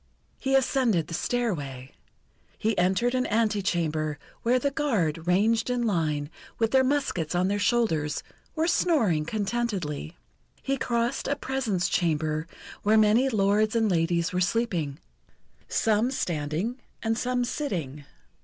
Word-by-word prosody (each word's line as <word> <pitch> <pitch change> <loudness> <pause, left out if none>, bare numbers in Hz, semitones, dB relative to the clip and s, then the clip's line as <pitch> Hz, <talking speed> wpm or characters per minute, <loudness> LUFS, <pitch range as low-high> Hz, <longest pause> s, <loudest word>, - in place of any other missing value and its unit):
He 270 0 +1
ascended 250 - +2
the 165 - -9
stairway. 145 - -2 0.7
He 220 0 0
entered 190 +7 +2
an 255 0 +1
antechamber, 175 -9 0 0.2
where 245 +2 +3
the 280 +3 0
guard, 180 - -1
ranged 220 +6 +2
in 245 -1 0
line, 155 -7 0 0.3
with 225 -1 +1
their 265 0 +5
muskets 255 - 0
on 180 +2 +2
their 205 +1 0
shoulders, 205 -11 +1 0.3
were 320 0 +1
snoring 225 - +2
contentedly. 195 -7 -2 0.5
He 275 - 0
crossed 235 -1 -1
a 285 - +1
presence 260 -10 -1
chamber 155 -2 0 0.3
where 215 +2 +4
many 220 +5 +4
lords 215 0 +2
and 225 -3 +2
ladies 170 0 +1
were 180 - 0
sleeping, 180 -8 0 0.7
some 220 +2 +2
standing 175 - -2 0.2
and 225 0 +1
some 245 +1 0
sitting. 165 - -3
210 Hz, 130 wpm, -27 LUFS, 165-240 Hz, 0.7 s, their